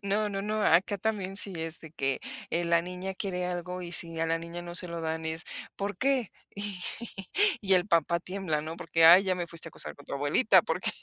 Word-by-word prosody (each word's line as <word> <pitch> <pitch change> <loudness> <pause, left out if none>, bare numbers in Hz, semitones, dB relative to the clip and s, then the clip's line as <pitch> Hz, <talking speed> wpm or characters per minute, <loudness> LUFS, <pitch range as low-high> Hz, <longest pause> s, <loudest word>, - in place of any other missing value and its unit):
No, 205 +2 0
no, 195 -1 -4
no, 215 +1 -1
acá 190 +3 +3
también 195 -2 -2
sí 200 -1 +4
es 165 0 0
de 160 -2 -12
que, 135 -3 -1 0.3
eh, 170 +1 0
la 170 0 +2
niña 180 +2 -6
quiere 180 -2 -3
algo 180 0 -4
y 175 -1 -7
si 165 -1 +4
a 165 - +1
la 165 0 0
niña 170 +1 -7
no 175 0 -8
se 180 -1 +3
lo 170 0 -5
dan 160 0 -3
es, 160 +1 -2 0.3
¿por 200 -1 -3
qué? 265 -4 +1 0.2
Y 200 -2 -4 0.8
y 195 -1 +4
el 180 0 +2
papá 170 -1 +2
tiembla, 180 -4 -3
¿no?, 160 +2 -6
porque: 165 -1 +1
"Ay, 175 +4 +9
ya 190 -1 +1
me 175 -1 -4
fuiste 165 -2 -2
a - - -14
acusar - - -3
con 145 - -16
tu - - -5
abuelita", 170 - +4
porque 160 +4 -1
180 Hz, 235 wpm, -28 LUFS, 165-195 Hz, 0.8 s, Ay